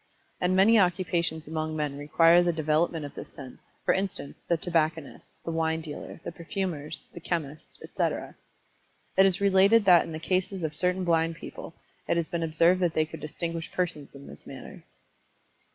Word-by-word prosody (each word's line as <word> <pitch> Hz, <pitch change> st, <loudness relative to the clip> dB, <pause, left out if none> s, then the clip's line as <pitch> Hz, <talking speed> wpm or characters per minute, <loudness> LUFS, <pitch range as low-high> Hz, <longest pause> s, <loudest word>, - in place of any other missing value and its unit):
And 180 Hz, +1 st, +1 dB
many 215 Hz, +4 st, +6 dB
occupations 175 Hz, -4 st, 0 dB
among 155 Hz, 0 st, -3 dB
men 150 Hz, -2 st, -2 dB
require 165 Hz, +4 st, +5 dB
the 175 Hz, 0 st, +2 dB
development 155 Hz, 0 st, 0 dB
of 145 Hz, -, -8 dB
this -, -, -9 dB
sense, 130 Hz, -3 st, -11 dB, 0.3 s
for -, -, +4 dB
instance, 190 Hz, -7 st, -3 dB
the 170 Hz, -, +2 dB
tobacconist, 160 Hz, -3 st, -1 dB, 0.2 s
the 165 Hz, -, -2 dB
wine 160 Hz, 0 st, 0 dB
dealer, 155 Hz, 0 st, -8 dB
the -, -, -5 dB
perfumers, 170 Hz, -3 st, -4 dB
the -, -, -8 dB
chemist, 160 Hz, -3 st, -4 dB
etc. -, -, -2 dB, 0.8 s
It 190 Hz, 0 st, +6 dB
is 190 Hz, +1 st, +2 dB
related 200 Hz, +2 st, +5 dB
that 180 Hz, -2 st, +7 dB
in -, -, -8 dB
the 155 Hz, -, -5 dB
cases 185 Hz, +2 st, -1 dB
of 155 Hz, -1 st, -2 dB
certain 180 Hz, +3 st, +1 dB
blind 165 Hz, -1 st, +1 dB
people, -, -, -9 dB, 0.3 s
it -, -, +1 dB
has 170 Hz, -2 st, 0 dB
been 170 Hz, -, -3 dB
observed 165 Hz, +3 st, +3 dB
that 175 Hz, -3 st, 0 dB
they 155 Hz, -, +3 dB
could 155 Hz, -, -9 dB
distinguish 165 Hz, +1 st, -5 dB
persons 165 Hz, -7 st, -3 dB
in 140 Hz, 0 st, -11 dB
this 70 Hz, -, -13 dB
manner. -, -, -10 dB
165 Hz, 175 wpm, -27 LUFS, 155-180 Hz, 0.8 s, that